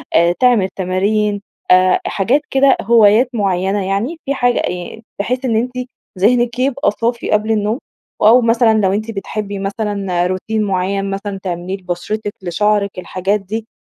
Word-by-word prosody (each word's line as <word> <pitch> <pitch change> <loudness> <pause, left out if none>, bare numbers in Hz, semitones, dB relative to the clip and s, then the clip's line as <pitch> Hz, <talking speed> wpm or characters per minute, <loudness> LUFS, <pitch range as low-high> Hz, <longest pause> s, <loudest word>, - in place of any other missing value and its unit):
آآ 170 +1 +5
تعمل 240 -7 +3
تمارين، 205 +2 0 0.3
آآ 185 0 +5
حاجات 240 +9 +1
كده، 270 0 +4
هوايات 225 +2 +5
معيّنة 195 -2 0
يعني 215 - -2
في 275 - 0
حاج 245 -2 +1
يعني 180 +5 -4 0.2
بحيث 250 +5 -2
إن 230 -3 +1
أنتِ 250 +3 -1 0.5
ذهنك 240 +4 +2
يبقي 260 -4 +1
صافي 235 +2 -2
قبل 210 +1 +1
النوم 215 +4 0 0.4
أو 230 +4 +6
مثلًا 230 -1 +3
لو 190 0 +2
أنتِ 215 +2 -2
بتحبي 200 -1 -5
مثلًا 195 -3 -2
روتين 215 +4 -2
معيّن 195 0 -1
مثلًا 195 0 -4
تعمليه 180 +1 -4
لبشرتِك، 195 +3 -4
لشعرِك، 200 +2 0
الحاجات 190 +3 -1
دي 220 +3 -6
205 Hz, 150 wpm, -17 LUFS, 190-230 Hz, 0.5 s, أو